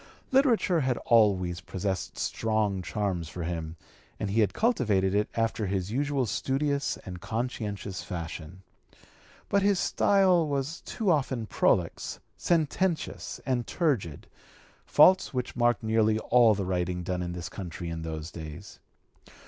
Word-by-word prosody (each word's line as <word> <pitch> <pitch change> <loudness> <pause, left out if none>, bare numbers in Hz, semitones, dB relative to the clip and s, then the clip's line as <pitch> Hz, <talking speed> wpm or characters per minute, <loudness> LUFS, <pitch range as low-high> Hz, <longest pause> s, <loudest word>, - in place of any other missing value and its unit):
Literature 245 - +3
had 130 -4 0
always 95 -6 +3
possessed 95 +1 -3
strong 110 -4 0
charms 90 -4 -2
for 90 -1 -5
him, 80 -1 -4 0.4
and 100 - -2
he 110 - +1
had 100 -3 +2
cultivated 105 - +1
it 105 +1 +1
after 115 -2 0
his 95 0 -2
usual 140 +1 0
studious 140 +6 -1
and 90 -2 -7
conscientious 105 -4 -4
fashion. 85 +1 -7 0.8
But 200 - +2
his 200 0 +3
style 185 -4 +3
was 140 +3 -2
too 215 -6 -1
often 130 -6 0
prolix, 105 - 0 0.2
sententious, 170 +1 -1
and 125 -3 -1
turgid 120 - -1 0.6
faults 185 -6 +5
which 125 - -3
marked 120 -1 +2
nearly 110 0 +2
all 115 -1 +4
the 100 -1 -2
writing 90 -1 -1
done 90 0 -2
in 85 0 -3
this 90 -1 -5
country 90 -2 -7
in 80 -1 -4
those 80 0 -5
days. 80 +4 -9
110 Hz, 135 wpm, -28 LUFS, 90-140 Hz, 0.8 s, faults